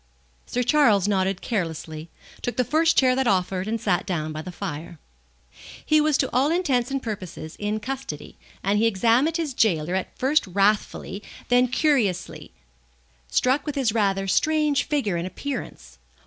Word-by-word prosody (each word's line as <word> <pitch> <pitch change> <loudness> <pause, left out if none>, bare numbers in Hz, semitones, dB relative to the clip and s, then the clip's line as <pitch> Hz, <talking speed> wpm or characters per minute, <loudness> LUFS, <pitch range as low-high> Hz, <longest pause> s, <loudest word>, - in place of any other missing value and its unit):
Sir 250 - -1
Charles 230 - +4
nodded 195 -2 0
carelessly, 165 -6 -4 0.3
took 245 - -3
the 250 - +3
first 320 +6 +2
chair 255 -1 +5
that 265 -1 +1
offered, 185 -1 0
and 225 +1 -1
sat 195 -5 +1
down 155 -5 -2
by 155 0 -5
the 180 - -7
fire. 170 -3 -6 0.9
He 310 0 +4
was 300 -2 +2
to 265 - 0
all 260 +4 +3
intents 280 -8 +1
and 275 -1 -3
purposes 185 -7 -6
in 210 +1 -1
custody, 255 - -6 0.3
and 200 +2 +2
he 225 - +4
examined 235 - +2
his 315 -5 -2
gaoler 175 -8 +1
at 190 0 -3
first 275 -1 +2
wrathfully, 200 +1 0 0.3
then 245 +1 +4
curiously, 245 - 0 0.8
struck 260 - +1
with 295 - -2
his 255 -6 +1
rather 195 -3 +1
strange 300 +5 +2
figure 240 - 0
and 170 +2 -3
appearance. 280 +8 -7
220 Hz, 160 wpm, -24 LUFS, 185-270 Hz, 0.9 s, chair